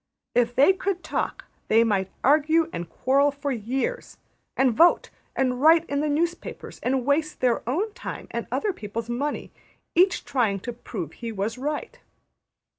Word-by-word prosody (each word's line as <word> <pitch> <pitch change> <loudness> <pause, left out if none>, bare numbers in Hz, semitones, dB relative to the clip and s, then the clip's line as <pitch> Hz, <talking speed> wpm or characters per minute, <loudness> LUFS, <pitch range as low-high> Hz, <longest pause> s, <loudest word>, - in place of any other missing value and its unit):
If 245 0 +2
they 280 +9 +6
could 380 -1 -3
talk, - - -3 0.2
they 225 +1 +5
might 195 -4 0
argue 315 +3 +3
and 170 0 -5
quarrel 275 - +2
for 285 0 -4
years; 265 - -3 0.4
and 260 -2 +3
vote; 340 +9 +4 0.2
and 255 -1 0
write 325 +2 +6
in 280 - -1
the 300 - 0
newspapers; 335 +4 -3
and 255 0 0
waste 305 +2 0
their 245 -2 +2
own 405 - -1
time - - -7
and - - -4
other 420 -2 0
people's 225 - -5
money; 285 +5 -3 0.4
each 360 +1 +3
trying 225 -7 +1
to 240 - -5
prove 200 - -6
he 235 -1 -6
was 220 +4 -3
right. 300 - -4
270 Hz, 160 wpm, -25 LUFS, 235-320 Hz, 0.4 s, they